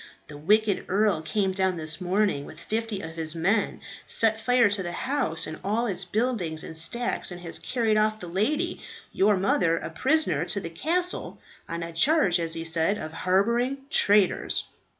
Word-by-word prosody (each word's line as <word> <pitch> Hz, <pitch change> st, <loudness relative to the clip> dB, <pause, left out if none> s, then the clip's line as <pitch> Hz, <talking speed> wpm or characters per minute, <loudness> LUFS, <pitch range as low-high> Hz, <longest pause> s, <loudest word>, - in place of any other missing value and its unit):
"The 150 Hz, -, -9 dB
wicked 205 Hz, +4 st, +2 dB
earl 200 Hz, -4 st, +1 dB
came 190 Hz, +5 st, -1 dB
down 190 Hz, -1 st, 0 dB
this 155 Hz, -1 st, -4 dB
morning, 185 Hz, -4 st, 0 dB
with 155 Hz, -, -11 dB
fifty 220 Hz, +1 st, -3 dB
of 160 Hz, -, -7 dB
his 160 Hz, -1 st, -4 dB
men, 195 Hz, +6 st, 0 dB, 0.3 s
set 220 Hz, -1 st, +3 dB
fire 245 Hz, 0 st, +3 dB
to 200 Hz, -1 st, 0 dB
the 175 Hz, -1 st, -4 dB
house, 255 Hz, -, 0 dB
and 155 Hz, 0 st, -7 dB
all 215 Hz, +4 st, 0 dB
its 195 Hz, -4 st, 0 dB
buildings 185 Hz, -6 st, -2 dB
and 165 Hz, -, -8 dB
stacks, 235 Hz, +10 st, +2 dB
and 180 Hz, -1 st, -6 dB
has 170 Hz, -1 st, -4 dB
carried 225 Hz, -4 st, 0 dB
off 215 Hz, 0 st, +1 dB
the 180 Hz, -, -7 dB
lady, 295 Hz, -, -1 dB, 0.3 s
your 200 Hz, +1 st, +2 dB
mother, 185 Hz, -3 st, +1 dB
a -, -, -6 dB
prisoner 260 Hz, -, +1 dB
to 200 Hz, -, -2 dB
the 165 Hz, -4 st, -7 dB
castle, 350 Hz, -, -2 dB, 0.3 s
on 170 Hz, 0 st, -4 dB
a 165 Hz, 0 st, -7 dB
charge, 200 Hz, -, +3 dB
as 165 Hz, -1 st, -2 dB
he 165 Hz, 0 st, -5 dB
said, 165 Hz, +5 st, +1 dB
of 155 Hz, -4 st, -7 dB
harbouring 235 Hz, +10 st, +1 dB
traitors." 205 Hz, -, +3 dB
195 Hz, 180 wpm, -26 LUFS, 165-225 Hz, 0.3 s, set